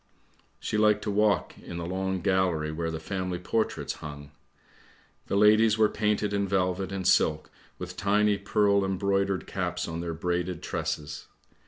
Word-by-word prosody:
She 110 - -2
liked 105 -1 +3
to 105 - -2
walk 105 0 +2
in 85 - -8
the 85 - -4
long 95 +1 -2
gallery 90 -5 +1
where 80 +1 -3
the 80 -1 -4
family 90 +1 -3
portraits 110 +5 -1
hung. 75 -1 -8 1.0
The - - -1
ladies 110 +2 +5
were 110 -1 +4
painted 105 -1 0
in 100 -1 0
velvet 95 0 0
and 95 -2 -2
silk, 75 -1 +2 0.3
with - - -7
tiny 105 0 +2
pearl 100 0 +2
embroidered 95 -1 0
caps - - -3
on 80 +1 -4
their 85 -1 -4
braided 90 +1 -2
tresses. 75 0 -4
95 Hz, 155 wpm, -27 LUFS, 85-105 Hz, 1.0 s, ladies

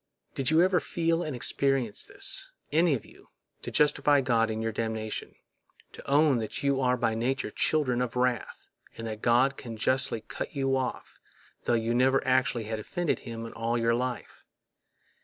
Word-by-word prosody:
Did 135 - -1
you 160 +2 +5
ever 185 -1 +3
feel 165 0 0
and 155 -5 -3
experience 130 -3 -1
this, - - -2 0.2
any 160 0 +4
of 115 - -6
you—to - - -14
justify 145 -1 +3
God 115 -4 +2
in 110 0 -3
your 110 0 -1
damnation—to 110 +3 -7
own 145 -2 +4
that 110 +4 -3
you 140 -1 +2
are 125 -1 +2
by 115 -1 +1
nature 125 +5 -1
children 130 -6 +1
of 125 -1 -2
wrath, 125 -3 -1 0.3
and 115 - -6
that 110 -1 -5
God 125 +3 +2
may 115 -3 -6
justly 130 0 +1
cut - - -7
you 135 -1 +1
off, 130 -2 -4 0.5
tho 120 - +2
you 115 +1 0
never 130 +2 +3
actually 130 -2 +2
had 110 0 -4
offended 175 - -2
Him 115 -1 -7
in 115 - -8
all 115 +1 -1
your 115 0 +2
life? 125 +1 -4
125 Hz, 170 wpm, -28 LUFS, 115-140 Hz, 0.5 s, you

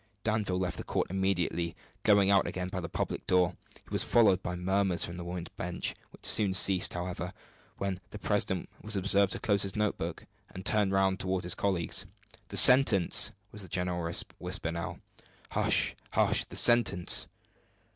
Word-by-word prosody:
Danville 105 -4 -1
left 90 -1 -3
the - - -6
court - - -2
immediately, 90 -3 -1 0.3
going 100 -2 +4
out 100 -1 +3
again 90 0 -4
by 90 - -4
the 85 - -6
public - - -4
door. 90 -1 +2 0.3
He - - -23
was - - 0
followed 100 -6 +3
by 90 -1 -4
murmurs 95 0 0
from 85 - -8
the 90 - -7
women's 85 0 -6
benches, 90 0 -3 0.2
which - - -15
soon 100 -4 +4
ceased, 95 -1 +3
however, 90 0 -5 0.4
when 95 -2 -3
the - - -9
president - - -1
was 110 0 -3
observed 100 0 +2
to - - -5
close 100 -2 +1
his 95 -1 -2
note 105 -1 -1
book, 80 0 -5 0.2
and 95 - -10
turn 105 -2 +2
round 95 0 +1
toward 95 -1 -2
his 90 - +1
colleagues. 95 0 -2 0.4
"The - - -2
sentence!" 125 -9 +7 0.2
was 105 - -8
the 95 - -8
general 90 -1 -3 0.3
whisper 80 - -4
now. 85 0 -6 0.5
"Hush, - - +2 0.2
hush - - +3
the - - -10
sentence!" 120 -7 +3
95 Hz, 175 wpm, -29 LUFS, 90-100 Hz, 0.5 s, sentence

